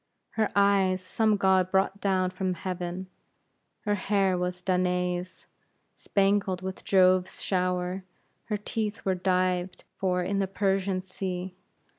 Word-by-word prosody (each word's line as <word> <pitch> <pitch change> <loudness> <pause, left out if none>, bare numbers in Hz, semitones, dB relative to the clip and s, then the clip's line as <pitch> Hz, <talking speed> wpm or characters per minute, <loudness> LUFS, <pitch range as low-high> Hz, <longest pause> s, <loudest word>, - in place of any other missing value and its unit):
Her 215 -2 0
eyes 200 -2 +4
some 210 +3 +1
god 190 -2 +3
brought 195 +1 +1
down 185 -2 +1
from 185 0 -2
heaven; 180 0 -4 0.8
her 210 - 0
hair 195 -1 +1
was 180 0 -3
Danae's, 180 -1 -1 0.5
spangled 195 -2 +1
with 190 0 -5
Jove's 185 -1 +3
shower; 180 0 -1 0.4
her 215 -2 -1
teeth 215 +1 -3
were 190 - +2
dived 180 -1 0 0.2
for 180 -1 +1
in 195 +2 -1
the 195 - +1
Persian 195 -1 0
Sea. 185 -1 -4
185 Hz, 125 wpm, -28 LUFS, 180-195 Hz, 0.8 s, eyes